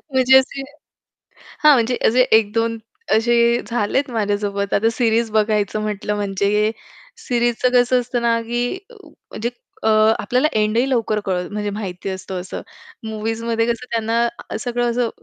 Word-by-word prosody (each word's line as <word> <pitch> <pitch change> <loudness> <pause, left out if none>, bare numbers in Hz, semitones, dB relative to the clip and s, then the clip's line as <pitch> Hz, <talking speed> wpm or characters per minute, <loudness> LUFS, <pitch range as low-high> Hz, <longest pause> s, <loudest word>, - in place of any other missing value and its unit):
म्हणजे 260 0 +5
असे 270 +1 -2 1.0
हां, 300 -1 +8
म्हणजे 240 -1 +1
असे 250 +3 +4
1-2 225 +1 +2 0.4
असे 235 +1 +2 0.3
झालेत 240 +4 0
माझ्यासोबत. 205 -2 -1
आता 225 +3 +3
सीरीज 230 -1 +1
बघायचं 215 -1 +1
म्हटलं 210 0 -2
म्हणजे 205 +1 0 0.5
सीरीजचं 240 - 0
कसं 250 +1 +4
असतं 245 0 -3
ना, 230 -1 +2
की 240 +6 -2 0.2
म्हणजे 240 - -7 0.3
अ, 220 - +2 0.3
आपल्याला 250 +7 +1
एंडही 220 +4 +1
लवकर 225 -4 0
कळत 180 -2 -2
म्हणजे 210 0 -3
माहिती 195 -2 -5
असतं 190 0 -5
असं. 185 - -7 0.4
मूव्हीजमध्ये 225 +1 -2
कसं 235 +1 -2
त्यांना 230 +1 -1
सगळं 240 0 -1
असं 235 -1 0
225 Hz, 135 wpm, -20 LUFS, 210-240 Hz, 1.0 s, हां